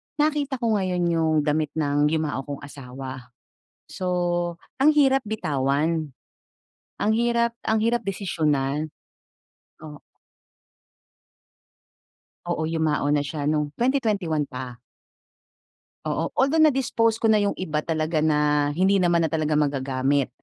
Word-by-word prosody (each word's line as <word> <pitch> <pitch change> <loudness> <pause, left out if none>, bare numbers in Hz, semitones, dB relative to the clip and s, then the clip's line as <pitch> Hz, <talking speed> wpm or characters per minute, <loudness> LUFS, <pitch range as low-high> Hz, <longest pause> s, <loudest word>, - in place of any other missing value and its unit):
nakita 295 -2 0
ko 235 -3 -1
ngayon 180 -2 -1
'yong 160 -1 +1
damit 150 0 -1
ng 145 -1 +2
yumao 150 -3 -2
kong 145 -1 -6
asawa, 130 -2 -9 0.6
so 185 - -6 0.8
ang 305 +3 +6
hirap 270 -3 +4
bitawan, 155 -5 -1 0.9
ang 215 - +2
hirap, 235 +1 +2 0.2
ang 220 0 +2
hirap 235 +1 +1
desisyonan, 155 -6 -1 0.9
o 150 -2 -10 2.5
Oo, 170 -2 -1
yumao 155 -3 0
na 145 -1 +2
siya 145 0 -3
nung 150 -1 -1
2021 210 - 0
pa. 125 -2 -8 1.3
Oo, - - -1
although 305 +4 +3
na-dispose 250 -6 +2
ko 230 - -3
na 215 -1 +4
'yong 200 0 -1
iba 155 -5 -2
talaga 155 0 -1
na 150 -1 +2
hindi 190 +2 +3
naman 170 -2 +3
na - - -3
talaga 155 -1 0
magagamit. 135 -1 0
160 Hz, 120 wpm, -24 LUFS, 145-215 Hz, 2.5 s, ang